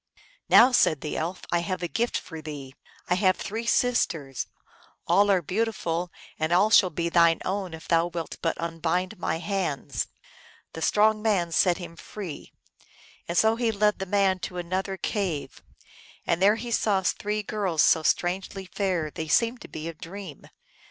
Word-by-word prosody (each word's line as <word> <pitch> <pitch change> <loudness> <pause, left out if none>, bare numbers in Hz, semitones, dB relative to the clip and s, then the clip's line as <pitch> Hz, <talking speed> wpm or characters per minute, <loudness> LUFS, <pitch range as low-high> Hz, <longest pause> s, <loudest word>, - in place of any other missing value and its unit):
Now," 250 +3 +8
said 155 - +3
the 150 - -4
Elf, 170 +4 -3
" - - -11
I 175 - +3
have 180 0 -3
a - - 0
gift 235 +6 -1
for 160 -2 -8
thee. 145 -3 -8 0.3
I 180 - +2
have 185 0 +3
three 225 +3 -5
sisters: 165 - 0 0.6
all 200 +4 +4
are 190 -3 +3
beautiful, 180 -3 -2 0.3
and 155 +1 0
all 195 +5 +4
shall 190 -4 +6
be 170 +1 -2
thine 170 -1 +4
own 190 -3 -2
if 160 - -13
thou 165 0 +3
wilt 170 -2 -6
but 165 - 0
unbind 170 +4 -2
my 160 -1 -1
hands." 180 -6 -2 0.7
The 160 - -7
strong 215 +4 +3
man 195 -6 +1
set 175 +1 +3
him 175 -2 -8
free. 180 -3 -8 0.8
And 170 - -2
so 220 +1 +4
he 235 -2 +1
led 210 0 +1
the 190 - -4
man 195 -1 +2
to 180 - -6
another 185 +2 -2
cave, 165 -11 -3 0.6
and 170 +1 0
there 205 +2 +6
he 235 +1 -6
saw 200 -4 +2
three 210 +3 -1
girls 190 -7 0
so 160 - +5
strangely 185 +4 -1
fair 180 -5 -2
they 160 - -5
seemed 230 +9 +2
to - - -9
be 155 +1 -7
a 165 - -5
dream. 175 -1 -9
180 Hz, 175 wpm, -26 LUFS, 165-205 Hz, 0.8 s, Now